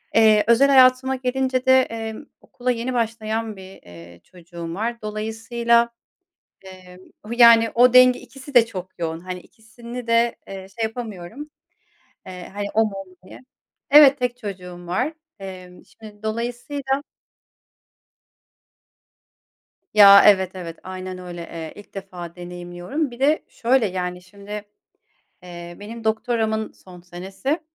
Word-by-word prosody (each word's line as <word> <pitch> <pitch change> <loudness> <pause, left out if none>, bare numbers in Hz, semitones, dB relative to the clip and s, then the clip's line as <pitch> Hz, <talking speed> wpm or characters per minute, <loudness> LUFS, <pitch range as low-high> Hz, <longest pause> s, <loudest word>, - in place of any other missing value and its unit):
Eee, 215 -2 +5
özel 235 +4 +5
hayatıma 260 0 +5
gelince 260 0 -1
de, 260 0 +6
emm, 225 +1 -6 0.2
okula 250 0 -3
yeni 245 +1 -3
başlayan 225 -1 -2
bir, 190 0 -13
eee, 85 0 -14
çocuğum 170 -2 -9
var. 235 +4 -3
Dolayısıyla, 225 +2 0 0.8
eee, 185 -1 -13 0.2
o, 210 - -12
yani, 230 -1 +7
o 245 +1 +5
denge, 255 0 +7
ikisi 270 +1 -13
de 240 -3 +7
çok 185 -5 -9
yoğun, 165 -1 -3
hani, 180 +1 -7
ikisini 235 +4 -11
de, 230 0 +2
eee, 190 -1 -8
şey - - 0
yapamıyorum, 225 +3 -6 0.8
eee, 180 -1 -9
hani, 205 0 -4
o 225 - +4
mu, 215 - -4
o 195 0 -7
mu 185 - -21
diye. - - -13 0.5
Evet, 285 -1 +8
tek 245 -1 -1
çocuğum 180 -6 -8
var. 255 - -1 0.3
Emm, 185 -2 -10
şimdi, 215 -1 -15
dolayısıyla 245 +5 -3 2.9
Ya, 200 -1 +9
evet, 190 -3 +5
evet, 170 -3 -8
aynen 185 0 -7
öyle, 175 -1 -8
eee, 165 -1 -8
ilk 205 - -15
defa 180 -3 -8
deneyimliyorum. 175 - -5
Bir 240 - -12
de, 295 +3 +2
şöyle, 245 0 +1
yani, 180 -1 -4
şimdi, 200 +2 -16 0.9
eee, 175 -1 -10
benim 225 +2 -9
doktoramın 220 0 -1
son 180 -1 -15
senesi, 190 - -4
220 Hz, 135 wpm, -22 LUFS, 185-240 Hz, 2.9 s, Ya